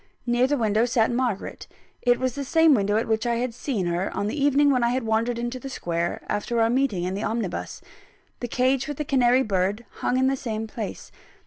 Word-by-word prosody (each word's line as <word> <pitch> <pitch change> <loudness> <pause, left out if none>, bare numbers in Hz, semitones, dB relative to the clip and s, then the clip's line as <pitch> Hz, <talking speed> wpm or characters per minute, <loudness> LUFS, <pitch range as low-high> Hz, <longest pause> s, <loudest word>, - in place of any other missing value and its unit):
Near 240 +1 +2
the 290 +1 +1
window 220 -1 +2
sat 235 -2 +2
Margaret 240 -5 -2 0.3
it 245 -1 +3
was 255 -2 -1
the 280 - -4
same 320 +3 +4
window 205 -3 +2
at 225 - -1
which 220 +1 0
I 235 - +1
had 240 0 -2
seen 230 -5 -2
her, 175 +2 -1
on - - 0
the 275 +7 -2
evening 285 0 +4
when 250 -3 +2
I 240 +2 +2
wandered 230 0 0
into 240 +2 -3
the 270 - -7
square, 170 -8 -3
after 230 +3 -1
our 225 0 +3
meeting 250 -8 +1
in 180 +1 -2
the 200 - -3
omnibus. 220 -5 -3 0.6
The 245 - -3
cage 255 +3 +1
with 290 -2 -5
the 300 - -3
canary 255 -2 +3
bird 200 +2 -1
hung 255 - 0
in 260 - +3
the 270 +1 +2
same 225 -4 -4
place. 215 -2 -7
240 Hz, 220 wpm, -25 LUFS, 215-260 Hz, 0.6 s, same